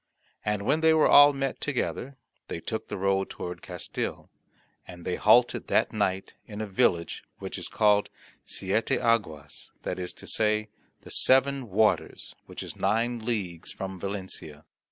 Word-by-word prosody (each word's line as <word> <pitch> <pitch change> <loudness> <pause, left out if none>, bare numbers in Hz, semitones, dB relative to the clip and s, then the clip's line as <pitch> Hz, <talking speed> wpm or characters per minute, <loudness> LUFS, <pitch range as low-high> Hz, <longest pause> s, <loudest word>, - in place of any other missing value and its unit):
And 105 -1 -1
when 150 +8 +1
they 160 0 +5
were 155 - +5
all 145 0 +8
met 135 -2 -3
together, 140 -1 -2 0.3
they - - -4
took 110 +6 -4
the 105 - -5
road 95 0 +1
toward 90 0 -6
Castille; 90 -2 -5 0.6
and 85 -1 -11
they 90 - -1
halted 120 +3 +4
that - - +2
night 95 +1 -1
in 105 -1 -8
a 110 - -2
village 90 -4 0
which - - -6
is - - -4
called 105 -1 +3 0.3
Siete 100 +4 -1
Aguas, 80 -11 -1
that 90 - -3
is 90 -1 -4
to - - -11
say, 110 0 +1 0.3
the - - -12
Seven 135 -1 +3
Waters, 105 +2 +1
which - - -7
is - - -7
nine 120 +2 0
leagues 100 -8 -3
from 95 -1 -6
Valencia. 95 -6 -6
105 Hz, 155 wpm, -27 LUFS, 95-120 Hz, 0.6 s, all